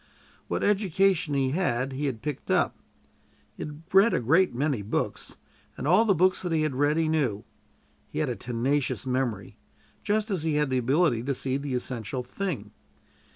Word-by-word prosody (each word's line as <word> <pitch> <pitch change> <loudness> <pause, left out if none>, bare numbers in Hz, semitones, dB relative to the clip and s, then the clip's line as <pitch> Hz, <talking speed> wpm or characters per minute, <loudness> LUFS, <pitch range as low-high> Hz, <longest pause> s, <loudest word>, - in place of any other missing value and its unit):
What - - -2
education 190 -5 +2
he 135 -1 +1
had, 135 -6 0
he 140 +2 -2
had 120 -5 -4
picked 150 -3 -5
up. - - +2 0.8
He - - -10
had 150 +1 -9
read 195 +4 +6
a - - +2
great 165 +10 +3
many 135 -2 -1
books, 100 - -3 0.4
and - - -3
all 190 +8 +5
the 200 -3 +3
books 185 +3 +3
that 180 - -3
he 160 -1 +2
had 155 -3 0
read 145 +4 +2
he 165 -1 +2
knew. 135 -10 0 0.6
He - - -9
had - - +1
a - - -2
tenacious 130 +4 -1
memory, 125 -6 -2 0.4
just 215 +1 0
as 185 -5 0
he 155 -1 0
had 150 -2 +1
the 130 - +2
ability 130 0 +2
to 135 +3 -2
see 130 +1 -1
the 140 -1 -2
essential 125 0 -3
thing. 145 - -4
145 Hz, 185 wpm, -27 LUFS, 125-175 Hz, 0.8 s, read